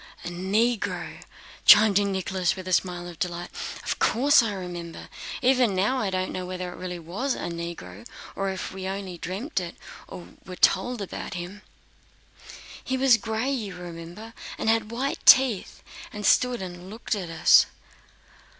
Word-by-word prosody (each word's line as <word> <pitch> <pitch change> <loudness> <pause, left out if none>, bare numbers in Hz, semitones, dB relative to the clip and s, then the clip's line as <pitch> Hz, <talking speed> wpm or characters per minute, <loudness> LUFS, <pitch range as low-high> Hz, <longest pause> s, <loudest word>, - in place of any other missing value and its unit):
"A - - -3
Negro," 200 +6 -1 0.4
chimed 210 -1 +8
in 200 -1 0
Nicholas 190 -1 0
with 185 -1 -8
a 185 - -1
smile 175 -1 0
of 175 -2 -10
delight. 175 0 -3 0.3
"Of - - -2
course 280 +4 +5
I 225 -2 -1
remember. 175 -3 -7 0.3
Even 250 -5 +3
now 210 +8 +1
I 210 - 0
don't 185 0 -2
know 185 - -4
whether 180 0 -5
there - - -10
really 180 -1 -5
was 190 - -3
a - - -4
Negro, 165 - -7 0.3
or 195 0 -1
if 190 -1 -4
we 190 0 -5
only 190 -2 -5
dreamed 200 - -3
it 175 -1 -6 0.3
or 175 - -10
were 185 - -8
told 245 +3 +2
about 190 - -6
him." 180 +4 -7 1.2
"He 260 - -1
was 260 -3 +5
gray, 225 +5 -2
you 215 -8 -3
remember, 175 +5 -9 0.2
and - - 0
had 225 -1 0
white 260 +5 -3
teeth, 255 -7 +5 0.3
and 210 0 -6
stood 250 -5 +3
and 180 0 -8
looked 225 +3 -4
at 190 -5 -4
us...." 165 -1 +6
190 Hz, 165 wpm, -26 LUFS, 175-225 Hz, 1.2 s, chimed